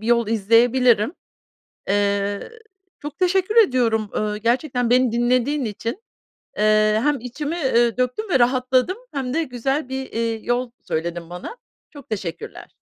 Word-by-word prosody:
bir 220 - -7
yol 235 -2 +2
izleyebilirim. 230 - +3 0.8
Eee, 200 - 0 0.5
çok 295 0 -8
teşekkür 375 +4 +1
ediyorum, 240 - +3
ööö, 210 0 -2
gerçekten 245 +2 0
beni 250 -1 +3
dinlediğin 250 +4 +1
için. 230 - -5 0.6
Eee, 215 0 +3
hem 295 -3 +1
içimi, 290 +7 -4
eee, 240 -6 +2
döktüm 255 - -1
ve 270 - +4
rahatladım 255 - +2 0.2
hem 265 -2 -3
de 330 0 +1
güzel 270 +3 -2
bir, 265 0 -4
eee, 230 0 -1
yol 245 0 -1
söyledin 170 +1 -4
bana. 180 - -7 0.3
Çok 285 -4 -13
teşekkürler. 185 -6 -6
245 Hz, 135 wpm, -22 LUFS, 215-270 Hz, 0.8 s, ve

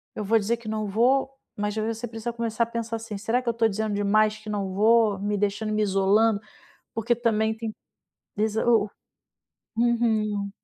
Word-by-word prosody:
eu 210 - -3
vou 225 +3 +3
dizer 230 +3 0
que 230 -2 -13
não 215 -1 -2
vou", 250 +7 +2 0.3
mas 210 +1 -2
aí 215 - 0
você 235 +2 -6
precisa 225 +1 -5
começar 235 -1 -1
a - - +1
pensar 230 0 -4
assim: 225 -2 -6
"Será 225 +5 0
que 240 - -2
eu - - +1
tô 230 0 +2
dizendo 215 0 -2
demais 215 +1 +2
que 215 0 -10
não 195 -2 -2
vou, 215 -1 +4
me 205 +1 -1
deixando, 205 +2 -1
me 215 - +1
isolando?", 200 +2 +3 0.6
porque 225 +2 +1
também 220 -2 +1
tem 225 -1 -4 0.7
de 210 - +1
iso 220 0 -1
o 220 -4 +3 0.9
o - - 0
uhum. 215 -4 +1
220 Hz, 195 wpm, -25 LUFS, 210-230 Hz, 0.9 s, vou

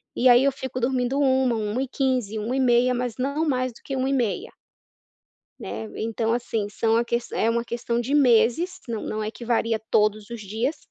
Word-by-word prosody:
e 255 +1 +4
aí 245 +2 +7
eu 275 - +4
fico 260 -1 -5
dormindo 255 +2 0
1h00, 260 -3 +3
1h15 250 +1 -1
e - - -2
1h30 250 +1 +2
mas 245 -1 -2
não 280 +5 -1
mais 255 -3 0
do - - -17
que 275 - -6
e - - 0
1h30. 255 -7 -1 1.1
Né. 105 +3 -5
Então, 225 0 -1
assim, 225 -3 -2
são 225 +2 +1
a 235 - +1
ques 235 0 -2
é 225 - +1
uma 235 0 0
questão 235 0 -2
de 265 +5 -3
meses, 255 +6 +3
não 225 -2 -3
não 215 0 -3
é 215 - -3
que 235 - -10
varia 230 -1 +1
todos 210 0 +2
os 235 -2 -7
dias. 225 +9 -2
240 Hz, 195 wpm, -24 LUFS, 225-260 Hz, 1.1 s, aí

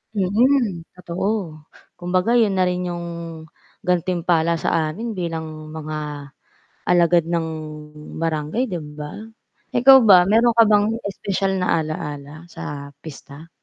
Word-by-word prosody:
Mm. 205 -2 +1
Totoo 180 -2 -3 0.4
kumbaga 180 +5 0
'yon 205 -4 +2
na 185 - +3
rin 180 0 -1
'yong 175 0 -4 0.8
gantimpala 175 -2 +1
sa 160 0 0
amin 225 +9 -5
bilang 160 -3 -5
mga 150 -2 -6 0.6
alagad 175 -1 +4
ng 170 -1 -1 0.7
barangay 165 - -1
'di 180 -3 -3 0.2
ba. 150 0 -7 0.6
Ikaw 265 +2 +8
ba, 185 -3 +8
meron 230 +3 +4
ka 230 - +8
bang 205 -1 +4 0.2
espesyal 195 0 -2
na 175 -3 +1
ala-ala 150 0 -6
sa 140 -1 -7
pista? 155 +1 -11
175 Hz, 120 wpm, -21 LUFS, 155-195 Hz, 0.8 s, Ikaw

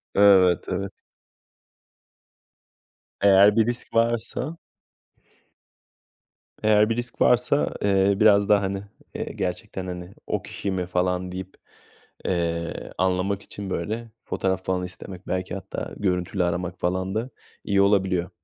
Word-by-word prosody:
Evet, 95 -3 +6
evet. 95 +1 -2 2.3
Eğer 100 +1 +6
bir 110 -1 +4
risk 120 0 -3
varsa 120 +7 0 2.1
Eğer 105 0 +5
bir 115 - +1
risk 120 -1 -5
varsa, 125 +4 +3
eee, 100 0 +3
biraz 100 -1 +5
daha, 105 -1 +5
hani, 95 0 -2 0.5
gerçekten, 95 -1 -4
hani, 90 +1 -7
"O - - -1
kişi 100 - -5
mi?" 90 -1 -1
falan 90 0 -1
deyip, 95 0 -7 0.7
eee, 85 -2 -2
anlamak 95 +2 0
için 100 -2 -8
böyle 115 +4 -3 0.2
fotoğraf 95 -1 -1
falan 90 -1 0
istemek 90 +1 -10
belki 90 +1 -2
hatta 95 0 -6
görüntülü 90 -1 0
aramak 90 +1 -2
falan 95 +2 -1
da 115 +4 -2 0.3
iyi 100 -1 +2
olabiliyor. 95 -3 +2
95 Hz, 115 wpm, -24 LUFS, 90-105 Hz, 2.3 s, Evet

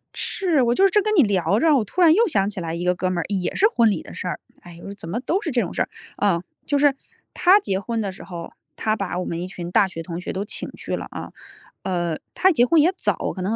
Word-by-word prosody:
是， 345 -8 0
我 240 -1 +3
就 385 - +3
是 - - +5
这 420 - +4
跟 430 +1 0
你 340 - +7
聊 200 -1 +1
着， 315 0 +4
我 250 - +2
突 355 - -3
然 330 -3 +7
又 455 +6 +4
想 200 - +1
起 210 -2 -6
来 165 -1 -4
一 170 +1 -3
个 180 0 +2
哥 185 +1 -1
们 185 - -2
儿， 165 - -2
也 190 -3 -2
是 410 - +5
婚 235 - +3
礼 185 - -2
的 - - -12
事 - - -5
儿。 175 - -3 0.2
哎 175 - -12
哟， 185 +4 -9
怎 180 -5 -9
么 210 +7 -2
都 330 +10 -1
是 325 - -3
这 245 -2 +2
种 180 - -4
事 - - -1
儿， - - -9 0.3
啊。 190 -5 +2 0.2
就 285 -2 +1
是 285 -1 +4 0.4
他 375 +3 +6
结 195 - -2
婚 230 +3 -3
的 200 -2 -2
时 185 - -12
候 170 -2 -8 0.2
他 215 0 0
把 195 -4 -3
我 180 - -3
们 165 - -3
一 180 - -4
群 175 -2 -7
大 195 +2 +4
学 175 -3 -7
同 170 0 -6
学 180 - -5
都 190 - -2
请 - - -5
去 - - -5
了 - - -5
啊。 - - -7 0.5
呃， 175 -3 -1 0.2
他 375 - +4
结 245 -8 +4
婚 320 +3 +4
也 345 - +4
早， - - -1
可 185 - -5
能 205 +4 0
200 Hz, 310 characters per minute, -22 LUFS, 180-295 Hz, 0.5 s, 你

